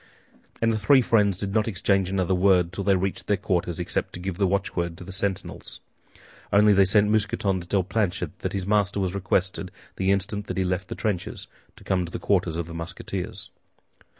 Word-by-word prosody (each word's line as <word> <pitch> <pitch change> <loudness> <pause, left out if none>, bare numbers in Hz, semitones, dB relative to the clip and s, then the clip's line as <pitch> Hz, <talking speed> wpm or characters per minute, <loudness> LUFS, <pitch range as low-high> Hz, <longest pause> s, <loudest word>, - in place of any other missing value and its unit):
And 115 0 +3
the 110 - -1
three 130 +5 +5
friends 105 -5 +3
did 100 0 -3
not 110 0 +2
exchange 100 -3 +1
another 95 -1 0
word 90 -2 +3
till 100 - -3
they 100 0 +3
reached 95 +1 -2
their 105 - +2
quarters, 90 -3 -1
except 90 0 -2
to - - -6
give 95 0 -5
the 100 - +3
watchword 90 -3 -1
to - - -9
the 95 - -9
sentinels. 95 0 -3 0.7
Only 105 +1 +6
they 100 0 +5
sent 105 +2 +4
Mousqueton 105 -3 +1
to 85 - -11
tell 95 0 +1
Planchet 100 -1 -2
that - - -3
his 95 -2 -2
master 100 0 +1
was 95 -2 -1
requested, 95 -1 -1 0.3
the 95 0 0
instant 100 +1 -1
that - - -4
he 95 - +2
left 90 +1 -2
the - - -5
trenches, 100 -5 -3 0.3
to - - -16
come 90 -1 0
to 85 - -7
the - - -3
quarters 90 -5 0
of 85 - -2
the 85 - -9
Musketeers. 95 +3 -6
95 Hz, 205 wpm, -25 LUFS, 90-100 Hz, 0.7 s, Only